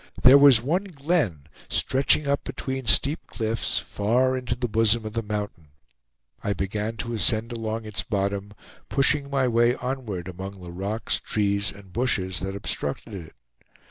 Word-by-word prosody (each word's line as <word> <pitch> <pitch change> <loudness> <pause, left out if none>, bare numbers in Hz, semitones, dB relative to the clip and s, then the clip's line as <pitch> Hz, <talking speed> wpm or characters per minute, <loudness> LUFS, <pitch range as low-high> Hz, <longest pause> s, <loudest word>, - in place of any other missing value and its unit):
There 130 +2 +9
was 135 -5 +7
one 175 +9 0
glen, 145 - -1 0.3
stretching 140 +2 +2
up 140 0 0
between 130 -2 -5
steep 135 - +3
cliffs 110 0 -2
far 125 +5 +1
into 125 -2 -2
the 125 0 -2
bosom 110 +1 +3
of 110 - -5
the 115 - -1
mountain. 105 -7 -5 0.8
I 100 - 0
began 105 +4 -3
to 120 +1 -4
ascend 110 +1 +2
along 115 -1 -4
its 105 -3 -1
bottom, 100 +1 -2 0.4
pushing 140 +1 +2
my 135 -2 +1
way 120 +1 +3
onward 120 -9 -4
among 95 +2 -7
the 85 - -8
rocks, 100 +6 -1
trees, 100 -1 0
and 95 -2 -15
bushes 95 -7 0
that 95 +1 -4
obstructed 100 +1 -4
it. 85 -5 -9
110 Hz, 155 wpm, -25 LUFS, 100-130 Hz, 0.8 s, There